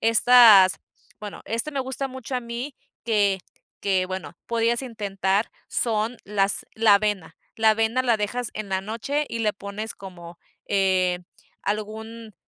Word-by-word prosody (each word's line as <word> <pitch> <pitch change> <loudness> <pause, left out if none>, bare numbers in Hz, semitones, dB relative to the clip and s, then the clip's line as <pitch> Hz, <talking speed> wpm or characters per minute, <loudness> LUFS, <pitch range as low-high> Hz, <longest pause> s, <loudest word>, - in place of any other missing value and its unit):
estas 225 -5 +7 0.5
bueno, 210 -1 -8
este 230 +7 -1
me 280 - -4
gusta 265 +1 -4
mucho 260 0 -7
a 250 - 0
mí 240 +3 -6 0.3
que 205 -4 +2 0.4
que, 190 -2 +1
bueno, 185 0 -6
podías 235 +1 +1
intentar, 200 -4 -1 0.2
son 225 +1 -1
las 200 -1 +1
la 220 -2 +5
avena. 200 -5 -1 0.2
La 220 0 +4
avena 225 +3 +1
la 240 -3 +2
dejas 220 +3 -3
en 215 -2 -5
la 190 0 0
noche 230 +9 -2
y 230 - -4
le 215 -2 +1
pones 200 +2 -6
como, 175 -3 -11 0.3
eh, 185 -2 +1 0.4
algún 220 +1 -5
215 Hz, 145 wpm, -24 LUFS, 195-235 Hz, 0.5 s, estas